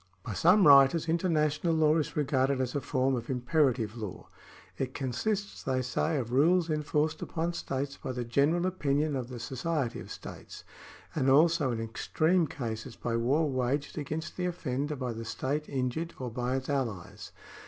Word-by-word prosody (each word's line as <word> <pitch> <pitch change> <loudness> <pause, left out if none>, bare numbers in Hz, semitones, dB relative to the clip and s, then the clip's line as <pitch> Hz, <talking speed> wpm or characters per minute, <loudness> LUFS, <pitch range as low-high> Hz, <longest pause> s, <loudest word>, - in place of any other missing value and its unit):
By 110 - -5
some 180 - +5
writers 140 +3 +7
international 165 -1 +1
law 155 -1 +4
is 155 - -2
regarded 135 -2 +1
as 125 -1 -1
a 145 - -1
form 130 -1 +1
of 120 -2 -3
imperative 125 -4 +1
law; 105 -5 -7 0.5
it 130 -1 -3
consists, 200 - -2
they 130 -1 -1
say, 150 +5 0
of 120 -3 -3
rules 165 +5 +3
enforced 155 +1 0
upon 170 +1 -2
states 140 -3 -3
by - - -5
the 125 -1 -3
general 145 +9 +2
opinion 150 -5 0
of 125 -3 -3
the 125 -1 -7
society 135 +1 -2
of - - -10
states, - - -9 0.5
and 135 -3 +1
also 155 +1 +4
in 115 - -2
extreme 155 +9 +1
cases 115 -2 -5
by 115 -1 -3
war 135 +7 +2
waged 135 +2 -1
against 155 +1 -4
the 180 0 0
offender 145 -4 -2
by 130 -3 -3
the 115 0 -6
state 140 +6 -3
injured 135 +5 -2
or 125 -2 -5
by 125 +2 -1
its 135 0 -3
alhes. 115 -11 -3
140 Hz, 170 wpm, -30 LUFS, 125-155 Hz, 0.5 s, writers